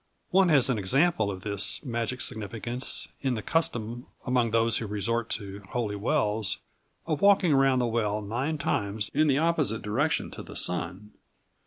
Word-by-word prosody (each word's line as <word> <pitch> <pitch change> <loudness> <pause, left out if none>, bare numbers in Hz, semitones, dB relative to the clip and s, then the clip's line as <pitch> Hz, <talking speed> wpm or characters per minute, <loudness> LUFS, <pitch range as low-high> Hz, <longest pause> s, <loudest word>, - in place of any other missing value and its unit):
One 190 0 +4
has 145 -6 +5
an 125 -5 0
example 120 - +2
of 95 -2 -5
this 100 +7 -1
magic 120 0 -2
significance 120 +3 -3
in 130 -2 0
the 110 - -5
custom, 120 -7 -1 0.2
among 125 -2 +2
those 115 0 +2
who 110 - -4
resort 115 +3 -2
to 100 -1 -9
holy 110 -4 -1
wells, 105 - 0 0.5
of 155 -3 -2
walking 195 -5 +5
round 135 -1 +4
the 125 - +1
well 110 -2 -1
nine 130 +10 -2
times 100 -5 -1
in 155 +1 +3
the 140 -2 +3
opposite 155 -8 +1
direction 135 +9 0
to - - -7
the - - -11
sun. 90 +4 +1
115 Hz, 165 wpm, -27 LUFS, 105-135 Hz, 0.5 s, has